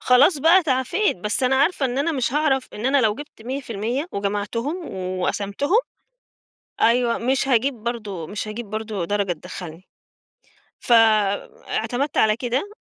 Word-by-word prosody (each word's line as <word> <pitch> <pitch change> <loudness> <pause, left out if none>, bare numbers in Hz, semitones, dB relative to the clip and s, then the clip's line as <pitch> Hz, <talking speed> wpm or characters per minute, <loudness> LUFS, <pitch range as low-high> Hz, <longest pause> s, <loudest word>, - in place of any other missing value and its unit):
خلاص 280 +6 +5
بقى 340 +6 +5
تعافيت، 265 - +1
بس 210 +7 -2
أنا 255 +1 +3
عارفة 280 0 +2
إن 245 +1 -3
أنا 310 +4 +1
مش 260 -3 -1
هاعرف 280 -3 +1
إن 215 +4 -3
أنا 275 0 +4
لو 215 -3 +2
جِبت 290 -4 -11
100% 250 - -3
وجمعتُهُم 205 - -2 0.4
وقسمتُهُم 205 - 0 1.0
أيوه، 235 0 +3
مش 265 +3 0
هاجيب 260 +2 +2
برضه، 210 -7 -5
مش 210 +3 -5
هاجيب 220 +2 -6
برضه 215 -3 -3
درجة 200 0 0
تدَخّلني، 175 +1 -9 0.9
ف - - -5 0.8
اعتمدت 275 +4 -2
على 215 -1 +4
كده، 250 - -2
245 Hz, 140 wpm, -22 LUFS, 210-275 Hz, 1.0 s, خلاص